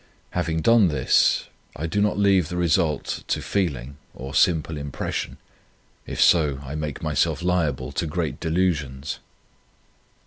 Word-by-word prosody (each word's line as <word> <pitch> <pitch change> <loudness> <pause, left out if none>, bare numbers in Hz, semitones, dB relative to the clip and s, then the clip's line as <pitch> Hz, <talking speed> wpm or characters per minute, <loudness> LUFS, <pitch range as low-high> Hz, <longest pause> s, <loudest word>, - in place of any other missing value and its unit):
Having 80 -2 -1
done 115 +1 +5
this, 75 -6 +3 0.3
I 80 - -4
do 100 +6 0
not 105 0 +1
leave 95 -5 +3
the 90 - -4
result 85 -2 0
to - - 0
feeling 70 -9 -2 0.2
or 65 +1 -7
simple 80 -2 +2
impression. 70 -2 -4 0.7
If - - -5
so, 75 -5 +4
I 70 +1 -7
make 75 -1 -4
myself 75 +2 0
liable 85 -7 0
to 70 +4 -2
great 80 0 -3
delusions. 75 -5 -1
80 Hz, 135 wpm, -24 LUFS, 70-90 Hz, 0.7 s, done